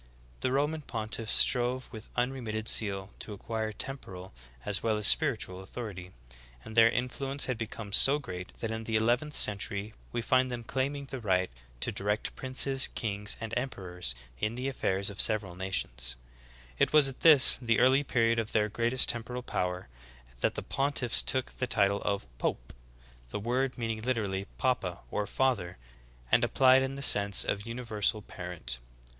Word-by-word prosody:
The 130 - -1
Roman 150 +4 0
pontiffs 115 -3 -3
strove 125 0 +2
with 110 -2 -10
unremitting 120 -4 -2
zeal 100 -3 -1
to 105 - -8
acquire 110 +2 -4
temporal 95 -7 -6 0.3
as - - -1
well 110 -2 0
as 105 - -1
spir 145 +3 +5
itual 95 -3 -6
authority; 95 -3 -8 0.6
and 110 - -9
their 115 0 +7
influence 135 +3 -2
had 130 - -2
become 110 -2 -6
so 135 +7 +6
great 90 -11 -7
that 115 - -2
in 110 0 -5
the 110 - -2
eleventh 120 +7 +1
century 100 0 +1 0.2
we 120 - -3
find 130 +1 +2
them 120 -1 -5
claiming 140 +4 -3
the 135 -1 -7
right 95 - 0 0.3
to - - 0
direct 105 +2 -3
princes, 135 +1 +3
kings, 105 -1 -3
and 115 0 -6
emperors 90 - -2 0.2
in 105 +2 -2
the 125 +2 -3
affairs 100 -7 0
of 100 - -12
the - - +3
sev 110 -1 +2
eral 90 -3 -10
nations. 60 -10 -2 0.6
It - - +3
was 150 -2 +6
at 135 - -4
this, 150 -6 +9
the 115 -2 +1
early 130 +3 +4
period 115 -3 +1
of 110 -1 -4
their 105 -1 +2
greatest 120 +4 +1
temporal 120 +1 -1
power, 90 -5 -3 0.5
that - - 0
the - - -4
pontiffs 135 -3 +1
took 130 -1 -1
the 125 - -3
title 100 -4 +2
of 100 -6 -2
Pope, - - -3 0.6
the 105 - -4
word 125 +5 -1
meaning 115 -2 -3
literally 105 -6 -2
papa, 95 -9 -1
or 105 -1 -2
father, 110 -10 -1 0.5
and - - +4
applied 130 0 +5
in 135 +1 -3
the 140 - -6
sense 100 -5 +4
of 100 +2 -3
universal 110 -3 -2
parent. 85 -12 -5
115 Hz, 170 wpm, -29 LUFS, 100-130 Hz, 0.6 s, this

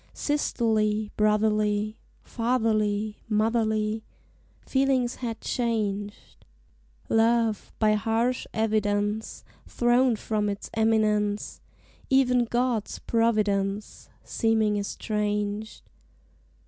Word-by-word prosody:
Sisterly, 220 -7 0
brotherly, 210 0 +1 0.3
Fatherly, 215 -3 0
motherly 220 0 +1 0.6
Feelings 265 -2 +1
had 230 -3 -4
changed, 210 -4 -3 0.6
Love, 225 -1 +2
by 215 -1 +3
harsh 225 +3 0
evidence, 210 -1 -1 0.2
Thrown 245 0 +3
from 210 -1 -1
its 200 0 -6
eminence; 215 -2 +1 0.5
Even 250 -2 +3
God's 240 -2 -1
providence 210 -3 0
Seeming 220 -2 +1
estranged. 210 +1 -3
220 Hz, 70 wpm, -26 LUFS, 210-230 Hz, 0.6 s, by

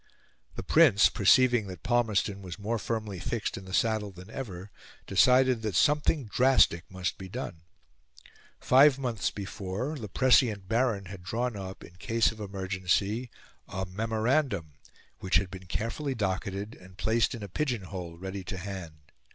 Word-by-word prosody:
The - - -5
Prince, 100 +2 +5
perceiving 120 +1 +4
that 90 -1 -9
Palmerston 110 -5 +1
was 90 -2 -7
more 110 +3 -2
firmly 110 -5 -3
fixed 115 +4 -3
in 95 - -8
the 95 - -10
saddle 110 0 +1
than 90 +2 -13
ever, 100 -7 -7 0.3
decided 125 +4 +4
that 110 -4 -3
something 150 - +2
drastic 110 -7 +3
must 95 +1 -3
be 95 -1 -8
done. 90 -7 -6 1.0
Five 135 +1 +6
months 115 -7 -1
before, 100 +7 -5
the 110 - -6
prescient 115 -4 +3
Baron 115 -3 +1
had 95 0 -9
drawn 115 +6 -2
up, 95 -1 -7
in 90 - -14
case 115 +4 +1
of 110 - -13
emergency, 100 +3 -1 0.4
a 95 0 -4
memorandum, 110 - -1 0.5
which 95 0 -1
had 90 +1 +2
been 95 -1 -10
carefully 130 - -3
docketed, 100 0 -3
and 95 0 -16
placed 115 +1 +1
in 115 - -8
a - - -5
pigeon 120 - -2
hole 90 -3 -7
ready 95 +2 -6
to 95 - -5
hand. 85 -6 -8
100 Hz, 155 wpm, -29 LUFS, 95-120 Hz, 1.0 s, Five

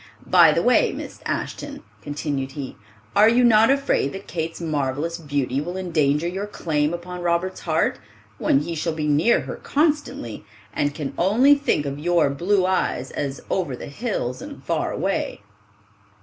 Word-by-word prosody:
By - - +7
the - - +1
way, - - +4
Miss - - -8
Ashton," - - -4 0.2
continued 145 -2 -3
he, 140 -3 -6 0.4
"are 210 +2 +7
you 245 +2 +4
not 225 -1 +6
afraid 275 - +1
that 195 +1 -8
Kate's 165 -1 -4
marvelous 150 0 -2
beauty 140 -3 -1
will 175 +4 -5
endanger 155 -4 +1
your 190 +4 -3
claim 155 -6 -1
upon 180 +1 -6
Robert's 175 +2 0
heart, 160 -1 0 0.4
when 135 - +3
he 170 - -4
shall 165 +1 -2
be 155 -1 -2
near 150 +11 +3
her - - -6
constantly, 290 - -1 0.3
and 145 0 -1
can 150 -4 -4
only 230 +11 +5
think 280 - +1
of 140 0 -4
your 170 -2 +2
blue 185 +6 +1
eyes 185 -8 0
as 140 -1 -4
'over 170 -9 -1
the - - -8
hills 140 - -3
and - - -9
far - - -1
away? - - -2
165 Hz, 165 wpm, -23 LUFS, 145-190 Hz, 0.4 s, By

